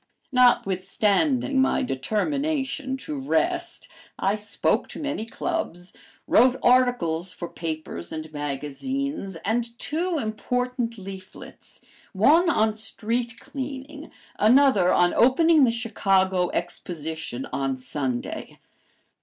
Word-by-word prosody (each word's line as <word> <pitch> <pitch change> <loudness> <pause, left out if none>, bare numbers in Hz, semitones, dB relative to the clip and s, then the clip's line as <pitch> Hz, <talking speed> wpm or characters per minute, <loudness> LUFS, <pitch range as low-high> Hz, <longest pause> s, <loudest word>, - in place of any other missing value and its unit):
Notwithstanding 250 - +2
my 265 - +2
determination 265 - -1
to 295 +1 -6
rest, 345 +5 -1 0.3
I 195 +2 +1
spoke 210 0 0
to - - -7
many 290 -7 -3
clubs, 210 - -4 0.3
wrote 250 +2 +5
articles 220 -9 +2
for 175 - -6
papers 155 - -5
and 155 0 -6
magazines, 185 - -4
and 235 +2 -1
two 335 +5 -1
important 250 0 -2
leaflets, 190 -1 -11 0.3
one 305 - +5
on 220 -8 +2
"Street 230 +2 -2
Cleaning," 280 +2 -7 0.3
another 220 -5 +5
on 175 0 +3
"Opening 300 +4 +5
the - - +2
Chicago 195 -6 +1
Exposition 160 -6 -4
on 135 -1 -1
Sunday." 130 -1 -4
230 Hz, 100 wpm, -25 LUFS, 180-270 Hz, 0.3 s, wrote